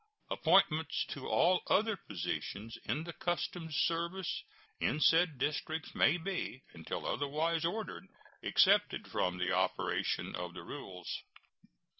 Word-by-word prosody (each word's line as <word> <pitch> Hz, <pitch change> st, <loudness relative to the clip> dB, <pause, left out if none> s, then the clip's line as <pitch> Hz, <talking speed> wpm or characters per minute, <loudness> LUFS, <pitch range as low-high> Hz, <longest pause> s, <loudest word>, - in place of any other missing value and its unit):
Appointments 160 Hz, 0 st, +3 dB
to 140 Hz, -, -5 dB
all 180 Hz, +2 st, +4 dB
other 220 Hz, +1 st, +3 dB
positions 105 Hz, -, -4 dB
in 155 Hz, -, -1 dB
the 170 Hz, 0 st, -6 dB
customs 175 Hz, -2 st, -2 dB
service 170 Hz, +4 st, 0 dB, 0.4 s
in 150 Hz, -, +1 dB
said 165 Hz, -1 st, +4 dB
districts 155 Hz, +4 st, -2 dB
may 150 Hz, +4 st, +4 dB
be, 175 Hz, -7 st, -4 dB
until 80 Hz, -1 st, -5 dB
otherwise 155 Hz, +3 st, 0 dB
ordered, 210 Hz, +6 st, -3 dB, 0.3 s
excepted -, -, +4 dB
from 90 Hz, 0 st, 0 dB
the 90 Hz, -, 0 dB
operation -, -, 0 dB
of 90 Hz, 0 st, -5 dB
the -, -, -7 dB
rules. 90 Hz, -1 st, -6 dB
160 Hz, 120 wpm, -34 LUFS, 135-175 Hz, 0.4 s, all